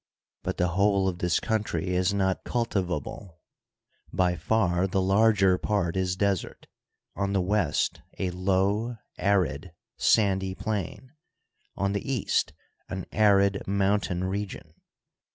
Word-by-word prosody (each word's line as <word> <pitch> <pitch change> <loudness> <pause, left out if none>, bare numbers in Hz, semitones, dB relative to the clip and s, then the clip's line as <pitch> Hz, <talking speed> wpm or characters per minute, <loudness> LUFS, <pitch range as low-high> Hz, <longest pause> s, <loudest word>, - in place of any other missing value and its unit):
But - - -3
the 90 0 +1
whole 100 +1 +2
of 90 -2 -2
this 90 -1 +1
country 105 -6 -1
is 90 +1 +1
not 95 -2 0
cultivable; 90 - -3 0.7
by 90 -1 +1
far 90 +1 +1
the 95 +1 0
larger 95 -1 +4
part 100 -5 0
is 95 -1 0
desert 100 -1 -1 0.3
— - - -56
on 100 0 -1
the 100 - +2
west 90 -5 0 0.2
a 95 -2 -1
low, 100 +6 0 0.2
arid, 90 -5 0 0.2
sandy 95 -3 +2
plain; 110 +5 -4 0.6
on 100 0 0
the 100 +6 -3
east 125 -7 0 0.4
an 95 -1 -4
arid 100 -2 +3
mountain 100 -2 +1
re 100 +2 -2
gion. 80 -4 -11
95 Hz, 130 wpm, -27 LUFS, 90-100 Hz, 0.7 s, larger